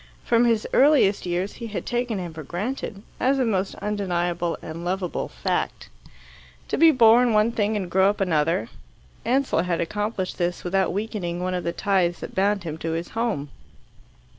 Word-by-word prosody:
From 235 0 +3
his 230 -2 +2
earliest 265 -10 +4
years 180 +3 -1
he 230 - -7
had 215 - -5
taken 240 -3 -1
him 175 -3 -5
for 160 - -7
granted, 200 - -4 0.2
as 270 +2 +2
a 260 - +2
most 195 -4 -1
undeniable 175 -4 -1
and 165 +2 -7
lovable 180 0 -2
fact. - - -3 0.8
To - - 0
be 330 +1 +8
born 240 -3 +5
one 215 +2 +3
thing 215 -1 0
and 190 -3 -3
grow 190 +2 +4
up 205 - -2
another 165 -1 +1 0.6
Ansell 260 -7 +2
had 175 -1 -1
accomplished 205 +2 -3
this 175 0 -1
without 190 +1 +1
weakening 195 -4 -3
one 185 +1 -2
of 180 -1 -2
the 170 - -1
ties 180 -3 +1
that - - -7
bound 200 0 +1
him 160 -1 -5
to 160 0 -2
his 165 +1 -3
home. 225 -11 -2
195 Hz, 175 wpm, -24 LUFS, 175-225 Hz, 0.8 s, be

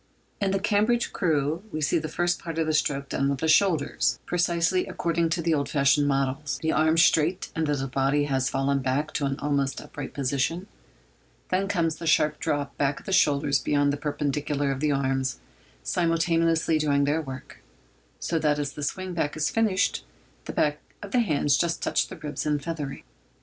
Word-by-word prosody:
In 200 - +2
the 195 - +1
Cambridge 215 +4 +1
crew 155 -1 0
we 155 - -3
see 155 +2 +1
the 155 - -4
first 175 +2 0
part 165 -1 -6
of 165 - +1
the 155 - 0
stroke 140 -2 0
done 140 0 0
with 140 - 0
the 160 - -1
shoulders—precisely 170 - +1
according 170 -1 0
to 165 +1 -1
the 165 0 +2
old 140 -2 0
fashioned 140 0 +3
models—the 140 +3 -1
arms 160 +1 +4
straight 165 +4 +1
until 155 -3 0
the 135 - -2
body 135 +2 +1
has 135 -2 0
fallen 140 +1 0
back 135 +3 -1
to 140 - 0
an 135 0 -2
almost 140 -2 -1
upright 145 -2 -8
position; 140 +6 -1 0.8
then 190 +2 +1
comes 170 -5 0
the 165 - -6
sharp 155 -1 +3
drop 145 -3 -2
back 140 0 +1
of - - -22
the 195 - -3
shoulders 140 -4 +3
beyond 145 -1 +1
the - - 0
perpendicular, 145 -1 -1
the 145 +3 0
arms 135 - -1 0.4
simultaneously 165 -1 +1
doing 140 -2 +2
their 150 +3 +1
work, 130 -3 -9 0.6
so 165 - -1
that 150 -1 +2
as 145 -1 -3
the 150 - -8
swing 185 +5 -3
back 155 -3 -2
is 155 - 0
finished, 220 -4 +1 0.4
the - - -4
backs 150 0 0 0.2
of 200 - -8
the 250 - +3
hands 150 - +2
just 170 -1 0
touch - - +1
the - - -9
ribs 150 -1 -5
in 150 -1 +1
feathering. 145 -1 -5
150 Hz, 185 wpm, -26 LUFS, 140-165 Hz, 0.8 s, arms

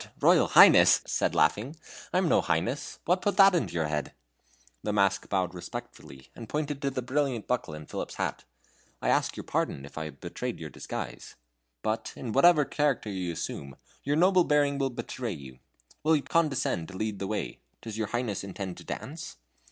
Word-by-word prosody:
Royal - - +5
Highness?" - - +8
said - - 0
laughing. 125 +9 +2 0.4
"I - - +1
am 185 -1 +2
no - - +4
highness. 120 - -1
What 180 +2 +2
put 205 - 0
that 195 -1 +8
in 175 - +1
your 80 -2 -1
head?" 75 0 -3 0.7
The 105 - -2
mask 100 -2 +1
bowed 95 -3 0
respectfully, 70 -6 -9
and 115 - -9
pointed 150 -2 -2
to 140 - +1
the 130 -2 -4
brilliant 130 -3 -1
buckle 120 -11 -2
in 75 0 -9
Philip's - - -5
hat. - - -3 0.6
"I - - -1
ask - - +1
your - - -5
pardon 70 - -2
if 70 - -8
I 80 - -3
have 70 -3 -9
betrayed - - -5
your - - -7
disguise. - - -7 0.5
But, 110 +1 -2
in 120 - -5
whatever 150 +3 +6
character 140 -9 0
you 90 -3 -3
asume, 70 -4 -5 0.3
your 145 +1 +1
noble 180 +2 +5
bearing 145 -2 +2
will 135 -1 +1
betray 120 -1 -4
you. 65 -5 -11 0.4
Will 160 +1 +4
you 145 - 0
condescend 135 - 0
to 95 - -9
lead 105 -1 -2
the 95 - -3
way? 100 - -3 0.2
Does 110 -2 -6
your 110 - 0
Highness 120 -4 -2
intend 95 -1 -6
to - - -11
dance?" 160 - -7
115 Hz, 190 wpm, -28 LUFS, 90-145 Hz, 0.7 s, Highness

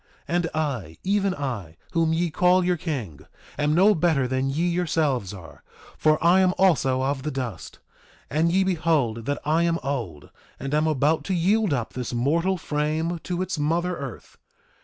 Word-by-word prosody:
2:26 - - -26
And 175 -2 +1
I, 125 - -2
even 195 -1 +1
I, 110 - -5
whom 165 -2 +1
ye 165 +1 0
call 180 +3 +3
your 180 0 +2
king, 130 - -4 0.4
am 150 +1 +1
no 195 +5 +6
better 160 -7 +1
than 130 +1 -1
ye 160 +6 0
yourselves 155 - 0
are; 85 -6 -12 0.3
for 155 0 +3
I 175 +3 +5
am 185 -1 +3
also 135 -8 +3
of 135 0 -1
the 150 - -3
dust. 130 -7 -5 0.5
And 160 +3 +1
ye 190 +2 +3
behold 155 -11 0
that 145 - 0
I 155 +3 +2
am 170 -1 +2
old, 115 - -4 0.3
and 135 +1 -4
am 155 +1 +2
about 155 +1 +1
to 190 - -1
yield 200 +3 +2
up 125 -5 -2
this 125 -1 -4
mortal 165 +10 +1
frame 155 +2 -2
to 180 +3 -3
its 185 -4 -4
mother 170 +4 0
earth. 140 -6 -9
155 Hz, 180 wpm, -24 LUFS, 130-175 Hz, 0.5 s, no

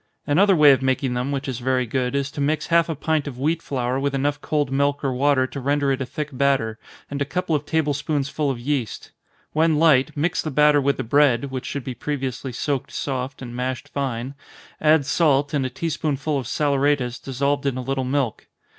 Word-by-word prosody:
Another 190 +7 +4
way 150 -3 +7
of 135 -1 +3
making 130 -1 0
them, 125 +3 -2
which 140 0 -3
is 130 -4 -3
very 130 0 +1
good, 125 +2 -1
is 140 0 -1
to 145 - -5
mix 150 +2 0
half 170 0 +3
a 160 - -1
pint 150 +1 -1
of 130 -4 -6
wheat 155 +5 0
flour 130 -2 -2
with 140 0 -1
enough 145 +1 -1
cold 145 -3 -1
milk 140 +1 +1
or 135 -2 0
water 135 0 +2
to 140 - -6
render 140 +1 +1
it 135 0 -1
a 130 - -3
thick 150 +3 -4
batter, 130 -5 +1 0.3
and 140 0 -3
a - - +4
couple 165 +2 -1
of 145 0 -3
table 160 -2 +1
spoonsful 145 0 -1
of 130 -3 -2
yeast. 125 -3 -3 0.4
When 160 0 +3
light, 150 -4 +3
mix 165 +4 0
the 155 - -4
batter 150 0 +4
with 140 +1 +1
the - - -2
bread, 140 0 +3
(which 130 -1 -4
should 140 -1 -4
be 130 - -4
previously 130 0 -4
soaked 135 +2 -2
soft, 130 -1 -4
and 120 -1 -7
mashed 130 +1 -3
fine,) 130 -2 -3 0.5
add 155 -2 +4
salt, 145 -1 +2
and 135 -3 +1
a - - -6
tea 135 +6 -3
spoonful 145 -1 -1
of 125 - -6
saleratus, 140 -3 +1
dissolved 140 +2 -1
in 130 -2 -1
a 130 - -3
little 135 +1 -1
milk. 130 -3 -2
140 Hz, 215 wpm, -23 LUFS, 130-145 Hz, 0.5 s, way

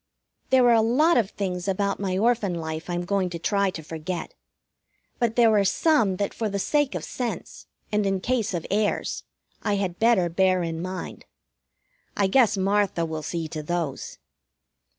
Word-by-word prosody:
There 255 -1 +5
are 240 - +6
a 225 - +5
lot 285 +10 +3
of 220 -5 +2
things 180 -3 -4
about 200 +1 0
my 190 -2 -1
Orphan 220 -4 +1
life 160 0 -5
I'm 175 0 -2
going 195 -1 0
to 170 - -5
try 200 +3 +1
to 165 -4 -7
forget. 165 +3 -5 0.9
But 235 -2 +1
there 230 -3 +5
are 205 - +4
some 215 - +2
that 200 +1 -2
for 220 -2 -2
the 200 - -2
sake 290 +7 +1
of - - -3
sense, 245 -2 -5 0.2
and 210 0 +1
in 195 -1 0
case 220 -2 -1
of 165 - -4
airs, 205 +1 0 0.4
I 205 -1 0
had 190 -3 -2
better 225 -6 +4
bear 185 +1 +2
in 165 -1 -3
mind. 185 0 -6 0.9
I 200 - +3
guess 220 +1 +3
Martha 195 -3 +1
will 160 -1 -4
see 165 +1 -3
to 155 - -5
those. 165 -3 -3
195 Hz, 175 wpm, -25 LUFS, 175-220 Hz, 0.9 s, are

